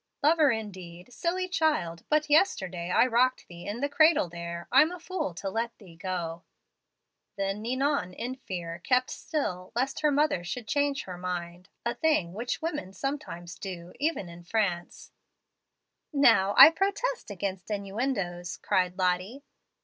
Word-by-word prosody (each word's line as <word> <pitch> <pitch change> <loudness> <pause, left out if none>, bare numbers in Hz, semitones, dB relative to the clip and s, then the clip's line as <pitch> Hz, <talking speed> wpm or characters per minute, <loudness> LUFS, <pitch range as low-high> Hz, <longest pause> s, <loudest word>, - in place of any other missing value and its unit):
"'Lover 310 0 +5
indeed! 190 -3 -5
Silly 365 +6 -1
child, 300 - 0
but 305 0 +2
yesterday 190 - +2
I 180 - +5
rocked 255 +1 +2
thee 175 0 -10
in 210 +5 -4
the 285 - +2
cradle 310 - +4
there. 170 0 -6
I'm 300 +6 +6
a 360 - -7
fool 335 - -3
to 195 - -5
let 230 +4 -2
thee 185 -6 -15
go.' 170 -2 -4 1.0
"Then 195 +1 -2
Ninon, 260 -4 0
in 240 +6 -4
fear, 175 -9 -6
kept 255 +7 +1
still, 185 - -3
lest 260 +3 0
her 305 - +3
mother 290 - +2
should 220 +6 -5
change 285 +2 +1
her 180 -2 -8
mind, 180 0 -5 0.2
a 235 - +1
thing 300 - +1
which 240 +9 -3
women 295 - -3
sometimes 190 - -5
do, 180 -3 -7
even 300 - -1
in 170 0 -11
France 175 -3 -2 0.5
" - - -56 0.2
"Now 225 -9 +4
I - - +12
protest 400 - -1
against 195 -1 -4
innuendoes," 200 -4 -2
cried 180 -1 0
Lottie. 185 +8 0
210 Hz, 150 wpm, -28 LUFS, 180-285 Hz, 1.0 s, I